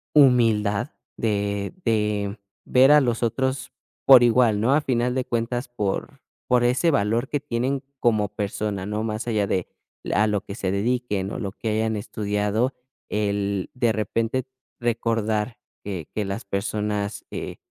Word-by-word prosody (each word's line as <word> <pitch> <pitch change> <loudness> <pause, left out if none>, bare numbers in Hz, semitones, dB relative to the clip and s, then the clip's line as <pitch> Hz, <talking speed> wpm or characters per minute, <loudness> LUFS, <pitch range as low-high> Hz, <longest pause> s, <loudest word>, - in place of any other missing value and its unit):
humildad 115 -7 +4 0.3
de 100 -2 -1
de 105 -2 0 0.3
ver 130 +3 +6
a 150 - +8
los 120 -4 0
otros 130 +3 -1 0.3
por 130 -3 +9
igual, 120 -3 +4
¿no? 130 +5 +3
Al 150 - +3
final 125 -2 0
de 130 -1 0
cuentas, 120 +1 -2
por 105 -5 -3 0.3
por 125 -1 +4
ese 130 +8 +3
valor 120 -1 +1
que 145 - 0
tienen 135 0 -1 0.2
como 110 -4 +2
persona, 105 -1 -3
¿no?, 105 +2 -2
más 110 +1 -3
allá 110 -4 +1
de 95 -2 -1 0.5
a 105 - +4
lo 105 -2 0
que 100 - -7
se 95 -3 -2
dediquen, 105 -1 -1
o - - -4
lo 100 -4 -4
que 110 - -4
hayan 110 +1 0
estudiado 105 +3 -1 0.3
el 100 -2 -1
de 120 -3 +2
repente 115 +4 -1 0.4
recordar 115 -1 0 0.3
que 95 -6 -5
que 105 -2 -1
las 100 +3 -4
personas, 100 +1 -2
eh, - - -5
110 Hz, 150 wpm, -24 LUFS, 105-120 Hz, 0.5 s, por